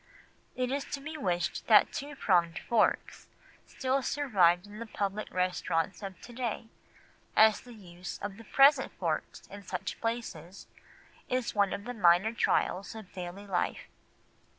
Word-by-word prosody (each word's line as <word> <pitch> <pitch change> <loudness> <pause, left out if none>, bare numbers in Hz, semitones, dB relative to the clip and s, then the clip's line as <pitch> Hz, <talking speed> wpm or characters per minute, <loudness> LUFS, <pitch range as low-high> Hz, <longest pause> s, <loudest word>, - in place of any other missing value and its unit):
It 250 0 -1
is 280 0 -1
to - - -9
be 310 +3 -7
wished 180 - -2
that - - +6
two 290 +1 -5
pronged 175 -8 +2
forks 235 -2 0 0.4
still 265 +1 -1
survived 195 -12 +2
in 205 +1 -11
the 230 - -6
public 205 0 -3
restaurants 180 -1 -1
of 195 -2 -7
to 240 - -11
day, 235 -2 -4 0.7
as 220 -1 +6
the 245 -1 -13
use 180 -3 -8
of 200 -1 -6
the 230 - -11
present 275 +3 +5
forks - - -3
in 205 - -10
such 185 -2 -5
places 200 -7 -4 0.6
is 255 -2 -1
one 200 -2 +2
of 200 - -4
the 245 - -5
minor 195 0 +4
trials 200 -2 0
of 215 -4 -10
daily 180 +2 -7
life. 190 -3 -2
205 Hz, 150 wpm, -30 LUFS, 185-245 Hz, 0.7 s, that